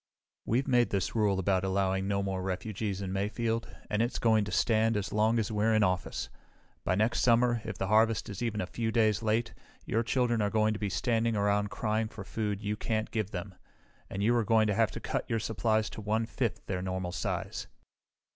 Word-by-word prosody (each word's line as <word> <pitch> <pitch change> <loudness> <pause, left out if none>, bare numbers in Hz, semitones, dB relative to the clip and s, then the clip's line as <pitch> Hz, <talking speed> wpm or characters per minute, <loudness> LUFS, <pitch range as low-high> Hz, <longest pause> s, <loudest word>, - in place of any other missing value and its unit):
"We've 125 +5 +1
made 125 -3 +3
this 100 -2 -1
rule 105 -4 +2
about 95 0 +1
allowing 95 0 0
no 100 0 0
more 95 -1 -2
refugees 100 +1 -3
in 95 -1 -3
Mayfield 115 +3 -1 0.2
and 105 +1 0
it's 120 +2 0
going 110 -2 +3
to 100 - -6
stand 110 -1 +2
as 100 - -3
long 110 +2 +3
as 110 0 0
we're 110 +1 +2
in 110 - +4
office. 90 -2 -1 0.6
By 95 - +1
next 110 +4 +1
summer, 120 0 +3
if 110 -4 -5
the 95 - -1
harvest 110 +2 +3
is 100 0 -6
even 115 -3 -1
a - - -1
few 110 +4 -2
days 110 -2 +2
late, 115 +1 0 0.3
your 115 - +1
children 120 -1 +1
are 105 - +1
going 110 0 +2
to 105 - -5
be 105 - -1
standing 115 +3 +1
around 105 0 +1
crying 110 +1 -1
for 110 -2 -9
food 105 0 -3
you 105 0 -1
can't 110 0 -2
give 110 -4 -1
them, 95 -1 -6 0.6
and 100 +1 -3
you 120 +3 +3
are 120 - +3
going 110 0 +4
to 105 - +1
have 110 0 +3
to - - -7
cut - - -3
your 115 - +1
supplies 110 +1 0
to - - -7
one 110 +2 0
fifth 115 -1 -3
their 90 -2 -2
normal 95 -1 -3
size. - - -3
110 Hz, 215 wpm, -30 LUFS, 100-115 Hz, 0.6 s, in